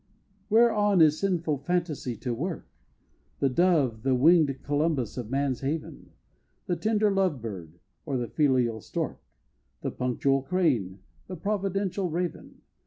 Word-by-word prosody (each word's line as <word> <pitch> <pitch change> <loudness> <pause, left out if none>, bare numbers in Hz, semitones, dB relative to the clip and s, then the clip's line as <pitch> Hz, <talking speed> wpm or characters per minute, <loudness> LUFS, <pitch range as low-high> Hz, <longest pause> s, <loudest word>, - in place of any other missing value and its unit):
Whereon 210 -3 +4
is 155 -1 +5
sinful 170 -7 0
fantasy 155 -5 -2
to 125 - -2
work? 165 +8 -4 0.7
The 135 - +1
Dove, 140 -7 +2
the 130 +2 +2
wing'd 145 0 +4
Columbus 145 -5 0
of 120 -4 -5
man's 135 -1 -1
haven? 150 +3 -5 0.5
The 175 - 0
tender 210 +4 +1
Love 190 -8 +1
Bird 90 -8 -8 0.3
or 140 -4 -2
the 120 -1 -2
filial 125 -5 +1
Stork? - - -4 0.6
The - - -3
punctual 135 +2 0
Crane 130 - 0 0.3
the 185 - -6
providential 195 0 -1
Raven? 175 0 -4
150 Hz, 130 wpm, -27 LUFS, 125-180 Hz, 0.7 s, is